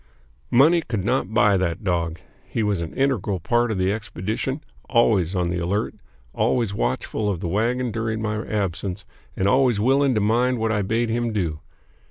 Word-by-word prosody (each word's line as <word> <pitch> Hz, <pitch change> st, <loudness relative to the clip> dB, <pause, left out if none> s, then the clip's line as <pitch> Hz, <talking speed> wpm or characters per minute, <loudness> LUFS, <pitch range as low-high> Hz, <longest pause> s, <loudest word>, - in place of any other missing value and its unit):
Money 155 Hz, +8 st, +5 dB
could 115 Hz, -, -3 dB
not 100 Hz, -, 0 dB
buy 105 Hz, -2 st, +4 dB
that 90 Hz, 0 st, -2 dB
dog. 85 Hz, -3 st, -1 dB, 0.3 s
He 115 Hz, -, -1 dB
was 100 Hz, -4 st, 0 dB
an 80 Hz, -, -4 dB
integral 125 Hz, -8 st, 0 dB
part 120 Hz, +8 st, +1 dB
of 110 Hz, -, -1 dB
the 95 Hz, +1 st, +1 dB
expedition: 110 Hz, -, -3 dB, 0.3 s
always 105 Hz, -8 st, +3 dB
on 90 Hz, -1 st, 0 dB
the 90 Hz, -, -1 dB
alert; 95 Hz, +5 st, -1 dB, 0.4 s
always 115 Hz, -5 st, +1 dB
watchful 105 Hz, -, -1 dB
of 95 Hz, -4 st, -2 dB
the 85 Hz, -, -3 dB
wagon 120 Hz, +6 st, 0 dB
during 110 Hz, 0 st, -2 dB
my 105 Hz, 0 st, -2 dB
absence, 100 Hz, -1 st, -3 dB, 0.3 s
and 95 Hz, -, 0 dB
always 125 Hz, -3 st, +3 dB
willing 135 Hz, +3 st, +3 dB
to -, -, +2 dB
mind 120 Hz, +4 st, +2 dB
what 110 Hz, -1 st, 0 dB
I 105 Hz, -1 st, +1 dB
bade 110 Hz, +4 st, 0 dB
him 120 Hz, 0 st, 0 dB
do. 85 Hz, -8 st, -2 dB
105 Hz, 180 wpm, -23 LUFS, 95-120 Hz, 0.4 s, Money